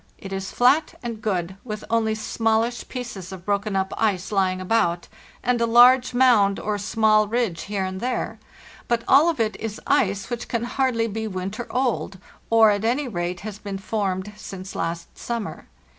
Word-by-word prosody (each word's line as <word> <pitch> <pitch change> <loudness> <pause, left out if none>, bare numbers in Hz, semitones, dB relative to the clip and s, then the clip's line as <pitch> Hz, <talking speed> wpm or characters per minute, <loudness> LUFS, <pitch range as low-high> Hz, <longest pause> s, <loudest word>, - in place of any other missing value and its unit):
It 195 -1 -8
is 195 0 -4
flat 275 +6 +3
and 230 -2 -5
good, 190 -3 -2
with 215 -3 -6
only 220 -1 +2
smallish 225 +2 0
pieces 235 -8 -6
of 185 -1 -9
broken 200 0 -1
up 190 0 0
ice 205 -4 0
lying 190 -2 +1
about, 180 -3 +1 0.4
and 245 0 +1
a 235 - +3
large 245 +2 +6
mound 225 -6 +4
or 210 -1 -2
small 215 0 +3
ridge 220 -7 -1
here 200 -2 -2
and 185 0 -4
there, 250 +1 -2 0.5
but 235 -1 +1
all 290 +6 +6
of 325 - -2
it 220 -1 0
is 220 -2 -5
ice 200 +3 +1
which 240 0 -4
can 235 -1 -2
hardly 240 -2 0
be 220 0 -3
winter 195 +4 -5
old, 245 -6 -1 0.3
or 225 -1 +6
at 205 0 -1
any 255 +5 +1
rate 175 -4 -3
has 210 0 -7
been 200 -2 -5
formed 195 0 -2
since 195 -2 -8
last 170 0 -4
summer. 235 -3 -5
215 Hz, 175 wpm, -23 LUFS, 195-235 Hz, 0.5 s, large